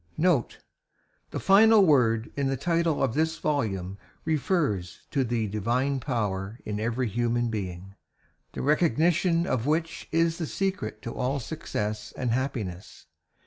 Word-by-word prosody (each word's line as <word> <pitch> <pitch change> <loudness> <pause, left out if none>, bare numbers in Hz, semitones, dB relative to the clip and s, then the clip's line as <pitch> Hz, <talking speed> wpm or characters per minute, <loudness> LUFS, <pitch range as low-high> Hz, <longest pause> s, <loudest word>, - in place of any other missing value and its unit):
NOTE 155 -7 +2 0.7
The - - -4
final 210 +1 +6
word 115 -7 +3
in 140 -1 0
the 135 0 0
title 170 0 +1
of 130 - +1
this 160 +3 0
volume 100 -10 -2 0.3
refers 145 - 0
to 135 - +1
the 120 -2 -1
DIVINE 120 +7 0
POWER 105 -5 -2
in 105 0 -3
every 120 +3 -1
human 120 +2 0
being, 95 -2 -5 0.6
the - - -4
recognition 165 +3 +2
of 130 -4 -1
which 160 +1 -1
is 165 +1 +2
the 165 - -2
secret 195 - -3
to 115 - -5
all 130 +3 -1
success 110 -8 -4
and 125 -3 -1
happiness. 115 -8 -4
130 Hz, 140 wpm, -27 LUFS, 110-160 Hz, 0.7 s, final